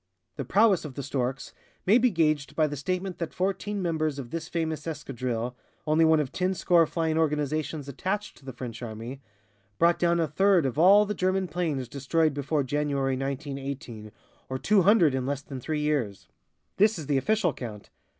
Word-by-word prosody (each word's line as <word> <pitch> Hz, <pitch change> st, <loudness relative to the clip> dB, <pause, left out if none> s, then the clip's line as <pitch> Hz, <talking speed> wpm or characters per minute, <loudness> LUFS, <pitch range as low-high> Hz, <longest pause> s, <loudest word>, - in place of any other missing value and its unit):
The 140 Hz, -, -4 dB
prowess 200 Hz, -, +4 dB
of 145 Hz, -5 st, -8 dB
The 140 Hz, -, -4 dB
Storks 135 Hz, -1 st, -3 dB, 0.3 s
may 215 Hz, +6 st, +5 dB
be 250 Hz, +1 st, +4 dB
gauged 155 Hz, -6 st, 0 dB
by 155 Hz, -, +3 dB
the 145 Hz, -1 st, -3 dB
statement 185 Hz, +6 st, -3 dB
that 170 Hz, -, -4 dB
fourteen 195 Hz, +2 st, -2 dB
members 155 Hz, -4 st, -1 dB
of 125 Hz, -4 st, -7 dB
this 165 Hz, 0 st, -5 dB
famous 160 Hz, -2 st, -2 dB
escadrille, 125 Hz, -5 st, -3 dB, 0.3 s
(only 155 Hz, +1 st, +3 dB
one 160 Hz, -1 st, +5 dB
of 140 Hz, -3 st, -2 dB
ten 185 Hz, +4 st, -1 dB
score 170 Hz, -3 st, +4 dB
flying 160 Hz, -1 st, 0 dB
organizations 150 Hz, -1 st, -1 dB
attached 190 Hz, +9 st, -3 dB
to -, -, -19 dB
the 135 Hz, -, -5 dB
French 120 Hz, -1 st, -7 dB
army), 120 Hz, +3 st, -7 dB, 0.6 s
brought 170 Hz, 0 st, +3 dB
down 170 Hz, 0 st, +2 dB
a 165 Hz, -, +1 dB
third 185 Hz, +2 st, +3 dB
of 130 Hz, +1 st, -2 dB
all 200 Hz, +5 st, +7 dB
the 210 Hz, -, -2 dB
German 185 Hz, 0 st, 0 dB
planes 155 Hz, -6 st, -2 dB
destroyed 150 Hz, +4 st, 0 dB
before 145 Hz, +1 st, -1 dB
January, 140 Hz, -1 st, 0 dB
1918, 135 Hz, -5 st, -5 dB, 0.4 s
or 130 Hz, -, -2 dB
two 200 Hz, +8 st, +3 dB
hundred 180 Hz, -7 st, +5 dB
in 130 Hz, -1 st, -1 dB
less 140 Hz, 0 st, -2 dB
than 135 Hz, -2 st, -7 dB
three 150 Hz, +4 st, -2 dB
years. 140 Hz, -10 st, -1 dB, 0.5 s
This 210 Hz, +1 st, +4 dB
is 155 Hz, -, -6 dB
the 140 Hz, 0 st, +1 dB
official 185 Hz, +2 st, +1 dB
count. 110 Hz, -5 st, -8 dB
150 Hz, 185 wpm, -27 LUFS, 135-175 Hz, 0.6 s, all